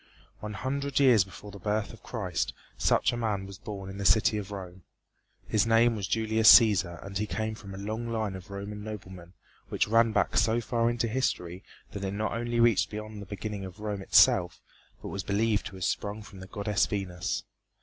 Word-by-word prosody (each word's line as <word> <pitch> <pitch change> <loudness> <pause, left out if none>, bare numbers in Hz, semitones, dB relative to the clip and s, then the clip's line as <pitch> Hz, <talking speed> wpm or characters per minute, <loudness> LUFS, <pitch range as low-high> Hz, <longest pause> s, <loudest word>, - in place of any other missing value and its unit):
One 105 0 -6
hundred 140 +7 -2
years 125 -8 +6
before 100 +2 -11
the 100 - -10
birth 105 +2 -2
of 115 - -14
Christ 95 -8 -3 0.2
such - - +2
a - - -3
man 105 -5 -1
was 100 0 -10
born 100 -4 -7
in 95 +1 -7
the - - -3
city 105 +1 +4
of 100 -2 -7
Rome. 95 -2 -8 0.7
His 110 +1 +2
name 115 +1 +4
was 100 -3 -3
Julius 110 +1 +5
Cæsar 95 -7 +5
and 100 -1 -4
he 105 - -1
came 110 0 -2
from 100 -3 -9
a - - -8
long 110 +4 -4
line 110 -4 -2
of 95 +1 -10
Roman 100 +1 -6
noblemen 95 -5 -9 0.4
which - - 0
ran 115 +1 +4
back 105 +1 +1
so 110 +1 +3
far 115 0 0
into 120 0 -1
history 95 -7 -2 0.3
that 100 - -6
it 95 0 -2
not 105 0 -1
only 120 +1 -2
reached 110 -5 +4
beyond 105 0 -7
the 100 - -9
beginning 100 0 -5
of 95 +1 -9
Rome 105 -2 -4
itself, - - +4 0.4
but - - -5
was 100 - -3
believed 105 +1 0
to 95 - -10
have 95 - -3
sprung 105 +1 -2
from 100 -2 -13
the 95 - -9
goddess, 105 +1 0
Venus. 95 -4 -3
105 Hz, 205 wpm, -28 LUFS, 95-110 Hz, 0.7 s, years